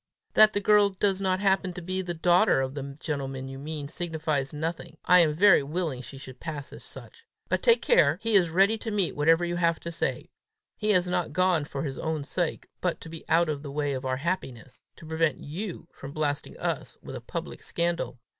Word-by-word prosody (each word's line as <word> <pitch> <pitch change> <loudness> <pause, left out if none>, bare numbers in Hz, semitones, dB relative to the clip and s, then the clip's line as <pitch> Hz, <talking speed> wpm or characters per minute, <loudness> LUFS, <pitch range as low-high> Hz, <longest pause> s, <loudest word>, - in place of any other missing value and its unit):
"That 215 0 +7
the 205 - +1
girl 205 0 +5
does 195 0 0
not 185 -1 +1
happen 190 -2 +2
to 180 - -7
be 185 +2 -2
the 175 -2 -4
daughter 175 +2 +4
of 130 0 -2
the 140 -1 -6
gentleman 135 -4 -4
you 135 0 -8
mean, 150 0 -5
signifies 155 -4 -2
nothing: 160 +1 -5
I 180 0 +7
am 155 -3 +4
very 195 0 +6
willing 150 -2 -3
she 135 +2 -10
should 130 -1 -10
pass 150 -4 -6
for - - -10
such. 460 - -11 0.3
But - - +1
take 470 -1 +4
care. 485 - +4
He 225 -1 -1
is 180 -4 +5
ready 195 +6 +3
to 225 - -5
meet 200 -5 0
whatever 165 +4 +3
you 175 0 -2
have 170 -1 +2
to 170 - -5
say. 165 - -3 0.4
He 215 0 0
is 180 -2 +3
not 180 -4 -1
gone 180 -3 +2
for 140 -2 -5
his 135 -3 -4
own 160 -2 -2
sake, 170 +3 -2
but 180 -2 -1
to 165 - -9
be 165 0 -9
out 170 +1 +4
of 150 -2 -2
the 145 - -7
way 145 0 -1
of 130 0 -4
our 130 0 -1
happiness 135 -7 -4
to - - -13
prevent 160 -1 0
you 175 +3 -6
from 135 +1 -10
blasting 145 -2 -2
us - - -3
with - - -7
a - - -6
public - - -6
scandal. 170 -5 -2
165 Hz, 220 wpm, -27 LUFS, 145-185 Hz, 0.4 s, That